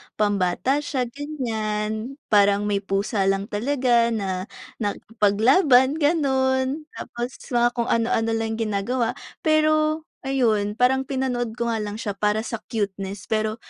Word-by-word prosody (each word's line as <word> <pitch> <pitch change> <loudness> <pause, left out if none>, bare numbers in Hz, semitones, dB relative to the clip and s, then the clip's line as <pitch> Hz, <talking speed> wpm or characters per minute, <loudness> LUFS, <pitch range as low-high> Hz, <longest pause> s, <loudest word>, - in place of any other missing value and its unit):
pambata 205 +5 +1
siya, 285 -3 -2
ganiyan. 225 -5 -3 0.2
Parang 205 0 +4
may 205 -1 0
pusa 195 0 -1
lang 195 0 +1
talaga 240 +1 +2
na 195 -4 -2 0.3
nakipaglaban, 245 - +3
gano'n, 275 -1 +1
tapos 240 +1 -5 0.2
mga 240 0 +2
kung 235 -1 -1
ano-ano 225 -1 +1
lang 225 0 -1
ginagawa, 225 +2 -1 0.3
pero 310 0 +2
ayun, 225 -7 +1
parang 265 +2 +2
pinanood 250 -4 -2
ko 235 -1 -1
nga 225 - -1
lang 210 -1 -4
siya 215 -1 -3
para 210 +2 0
sa 230 -2 -4
cuteness 200 -2 -3
pero 215 0 -1
230 Hz, 125 wpm, -23 LUFS, 210-265 Hz, 0.3 s, Parang